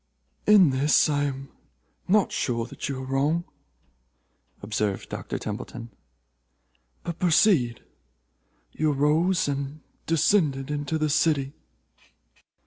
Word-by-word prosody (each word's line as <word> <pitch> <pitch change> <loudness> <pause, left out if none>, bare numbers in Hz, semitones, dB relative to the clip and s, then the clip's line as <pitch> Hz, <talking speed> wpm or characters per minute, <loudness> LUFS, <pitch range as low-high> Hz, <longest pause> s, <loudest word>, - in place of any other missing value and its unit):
"In 200 -8 +7
this 140 +3 +3
I 145 -1 +1
am 135 -1 -5 0.6
not 205 +1 +3
sure 115 -2 -1
that 125 - -6
you 135 - -3
are 130 - -6
wrong," 145 +6 0 1.2
observed 105 -1 -2
Dr. - - -5
Templeton, 115 -1 -7 1.1
"but 170 -1 -5
proceed. 165 - +3 0.9
You 155 -1 0
arose 160 +6 +2
and 140 +1 -4 0.3
descended 150 -5 +2
into 145 +1 -2
the 155 0 0
city." 145 -2 +1
145 Hz, 105 wpm, -25 LUFS, 135-160 Hz, 1.2 s, In